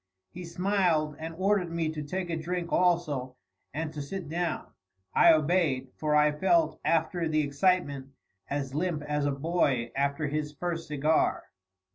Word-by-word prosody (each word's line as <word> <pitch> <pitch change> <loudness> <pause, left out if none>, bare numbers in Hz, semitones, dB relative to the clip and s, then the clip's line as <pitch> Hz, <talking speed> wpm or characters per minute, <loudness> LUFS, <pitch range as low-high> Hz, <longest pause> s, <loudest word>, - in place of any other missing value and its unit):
He 180 0 -8
smiled 170 -4 +1
and 160 +1 -6
ordered 190 -1 +1
me 165 -1 -1
to 155 -1 -4
take 175 +4 -4
a - - 0
drink 170 +2 -3
also, 155 -8 +1 0.4
and 155 +2 -4
to 150 - -5
sit 175 +4 -5
down. 175 +1 -2 0.4
I 170 - +7
obeyed, 155 -5 +2
for 150 -1 0
I 150 0 +5
felt, 160 0 +2
after 165 +1 +1
the 155 -1 +2
excitement, 145 -2 0 0.4
as 140 -2 -3
limp 155 0 -1
as 150 -1 -1
a - - +1
boy 140 -5 0
after 140 +2 0
his 150 0 -2
first 165 +1 -4
cigar. 150 +1 +1
155 Hz, 155 wpm, -28 LUFS, 145-175 Hz, 0.4 s, I